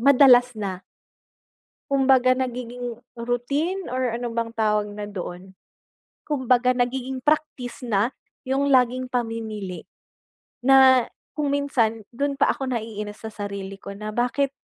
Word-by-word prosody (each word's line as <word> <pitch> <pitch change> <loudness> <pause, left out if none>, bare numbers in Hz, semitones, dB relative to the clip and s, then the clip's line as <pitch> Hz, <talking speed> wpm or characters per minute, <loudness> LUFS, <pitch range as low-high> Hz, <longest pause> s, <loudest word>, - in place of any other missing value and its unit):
madalas 250 -2 +6
na. 195 -3 -4 1.1
Kumbaga 265 -2 +4
nagiging 245 -2 -4 0.2
routine 280 +11 -1
or 255 -1 0
ano 240 -1 -3
bang 230 0 -1
tawag 210 -1 +1
na 205 0 -6
doon, 190 -1 -7 0.7
kumbaga 255 -3 +2
nagiging 255 +1 -1
practice 295 -4 -1
na 215 0 +2 0.4
'yong 270 +2 +1
laging 255 0 +3
pamimili, 220 -6 -4 0.8
na 260 -2 +7 0.3
kung 290 -2 0
minsan 245 -6 +1
do'n 280 +4 -1
pa - - +5
ako 270 - -5
naiinis 215 -3 -5
sa 220 - -6
sarili 200 -1 -6
ko 200 - -9
na 210 +2 -7
bakit 250 +5 0
245 Hz, 125 wpm, -24 LUFS, 215-265 Hz, 1.1 s, na